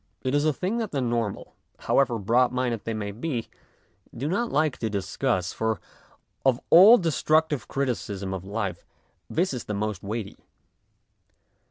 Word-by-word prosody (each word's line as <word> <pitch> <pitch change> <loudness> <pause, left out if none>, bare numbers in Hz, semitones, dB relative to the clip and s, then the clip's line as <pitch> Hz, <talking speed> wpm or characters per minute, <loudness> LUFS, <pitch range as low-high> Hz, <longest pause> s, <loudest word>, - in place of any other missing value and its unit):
It 130 0 -1
is 145 +1 +2
a 155 - +4
thing 190 +10 -2
that 225 -3 -2
the 145 - -2
normal, 120 -4 -2 0.3
however 125 -4 +2
broadminded 120 +2 +1
they 115 - -2
may 100 -1 -3
be, 120 +2 -4 0.7
do 135 +5 -2
not 225 +8 -1
like 155 -3 +1
to 110 - -1
discuss, 95 -3 -1
for 110 -3 -1 0.6
of 130 -2 +3
all 200 +8 +9
destructive 160 - +1
criticism 105 -8 -2
of 95 -2 -5
life 100 -1 -4 0.5
this 175 -1 0
is 125 - -5
the 105 - -3
most 105 -2 -2
weighty. 105 0 -5
120 Hz, 150 wpm, -26 LUFS, 105-150 Hz, 0.7 s, all